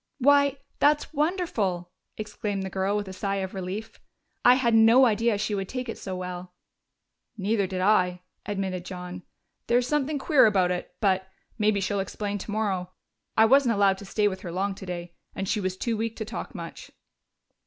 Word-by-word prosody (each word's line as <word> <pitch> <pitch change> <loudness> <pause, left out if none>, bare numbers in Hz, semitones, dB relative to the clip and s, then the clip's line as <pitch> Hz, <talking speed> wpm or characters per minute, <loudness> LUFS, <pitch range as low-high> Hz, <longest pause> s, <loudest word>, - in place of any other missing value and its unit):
'" - - -55
"Why, 280 +1 +4 0.2
that's 295 +2 +3
wonderful!" 280 - -1 0.3
exclaimed 210 -2 -3
the 190 - -5
girl, 195 +2 0
with 205 -1 -3
a 190 - -7
sigh 195 +1 -2
of 190 -1 -3
relief. 195 +4 -5 0.4
"I 245 +1 +8
had 240 -3 +2
no 225 +4 +7
idea 225 -1 +2
she 215 +1 -2
would 195 -2 -2
take 255 -1 -4
it 225 - -5
so 190 -2 -5
well." 180 0 -6 0.8
"Neither 200 0 +1
did 185 0 -3
I," 180 -3 +2 0.2
admitted 190 -3 -3
John. 180 0 -7 0.5
"There's 240 +1 +3
something 295 +1 0
queer 280 -3 +5
about 190 -4 +2
it 180 0 -4
but 190 -2 +1 0.3
maybe 210 -1 +3
she'll 200 +1 -1
explain 205 +1 -3
tomorrow. 200 -3 -2 0.5
I 220 - +7
wasn't 255 -1 +4
allowed 195 -1 +3
to 200 - -9
stay 210 +2 +1
with 190 -2 -3
her 175 - -6
long 195 +3 -1
today, 175 -2 -7 0.2
and 195 - -3
she 215 - 0
was 185 0 -2
too 230 +2 -1
weak 225 +1 -2
to 220 - -4
talk - - -6
much." - - -8
205 Hz, 185 wpm, -26 LUFS, 185-230 Hz, 0.8 s, I